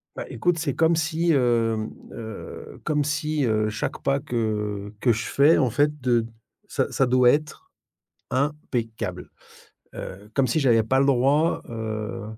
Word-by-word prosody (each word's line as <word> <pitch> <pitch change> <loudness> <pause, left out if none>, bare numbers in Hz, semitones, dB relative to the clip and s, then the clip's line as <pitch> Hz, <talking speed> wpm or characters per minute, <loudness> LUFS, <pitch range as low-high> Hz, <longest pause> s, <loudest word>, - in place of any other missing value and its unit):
Bah - - -5
écoute, 170 +9 0
c'est 150 -4 -1
comme 160 +1 +3
si, 165 +1 +1
hem, 115 -4 +1 0.2
heu, 110 -2 -8
comme 150 -1 +1
si, 150 -1 -1
heu, 110 -1 +1
chaque 105 - -4
pas 140 0 +1
que 105 -4 -2
que 125 - +3
je 115 0 +1
fais, 145 +4 +4
en 130 -4 +2
fait, 150 +4 +1
de 120 -2 +2 0.4
ça - - -1
ça 135 - +2
doit 125 0 +5
être 155 - -2 0.6
impeccable. 130 -5 -3 0.7
Heu, 100 +3 -8
comme 135 - +3
si 125 +5 +1
j'avais 120 -6 +4
pas 130 +4 +2
le 135 - +3
droit, 140 +5 +2
heu, 110 0 -4
125 Hz, 155 wpm, -24 LUFS, 110-150 Hz, 0.7 s, doit